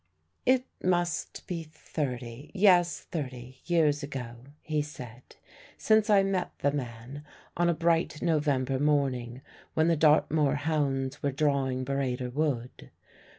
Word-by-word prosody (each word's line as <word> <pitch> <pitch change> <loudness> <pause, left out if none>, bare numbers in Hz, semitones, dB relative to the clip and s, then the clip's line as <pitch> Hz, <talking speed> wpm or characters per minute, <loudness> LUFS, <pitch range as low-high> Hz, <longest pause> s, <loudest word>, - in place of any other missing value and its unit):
It 255 0 +4 0.2
must 175 -2 -1
be 170 -2 -4
thirty 135 -5 -5
yes, 180 -3 +4
thirty 130 -4 -6
years 155 -4 +2
ago 130 -4 -6 0.3
(he 155 -1 0
said) 125 -5 -10 0.4
since 220 0 +3
I 200 -2 +6
met 195 -2 -1
the 140 - +1
man, 130 +1 -6 0.3
on 175 0 +2
a 170 - +2
bright 165 -1 +1
November 145 -5 +1
morning, 135 -4 0 0.3
when 160 +1 +3
the 165 - +4
Dartmoor 150 -1 +3
hounds 145 -3 -1
were 140 - 0
drawing 135 -2 0
Burrator 130 -2 -2
Wood. 135 -5 -2
145 Hz, 125 wpm, -29 LUFS, 130-165 Hz, 0.4 s, I